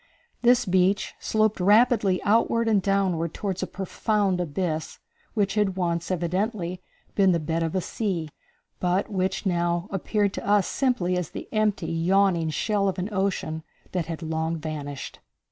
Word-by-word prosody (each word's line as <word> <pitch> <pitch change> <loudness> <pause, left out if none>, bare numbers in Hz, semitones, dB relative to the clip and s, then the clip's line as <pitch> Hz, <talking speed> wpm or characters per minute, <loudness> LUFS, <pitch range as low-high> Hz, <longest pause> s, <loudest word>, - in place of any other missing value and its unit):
This 245 0 +4
beach 190 +1 +2
sloped 215 -1 +1
rapidly 205 -1 +4
outward 230 +2 +2
and 210 -3 +3
downward 185 -5 0
toward 190 -3 -3
a 185 - -2
profound 195 0 0
abyss, 160 -1 -2 0.4
which 200 -3 +1
had 205 -3 +1
once, 170 -2 -1
evidently, 185 +1 -1 0.3
been 195 -2 +4
the 170 - +1
bed 160 +2 -1
of 165 +2 -1
a 185 - +1
sea, 180 -6 -2 0.5
but 180 +3 0
which 190 +1 -1
now 175 0 0
appeared 200 +1 0
to - - -5
us 205 -1 +4
simply 195 -10 0
as 180 -3 -2
the - - -7
empty, 210 -6 0
yawning 170 0 +2
shell 200 +6 0
of 190 - -4
an 185 +3 -2
ocean 190 -5 -1 0.3
that 175 -3 -2
had 165 0 -5
long 160 +1 -1
vanished. 150 -3 -6
185 Hz, 155 wpm, -25 LUFS, 170-205 Hz, 0.5 s, This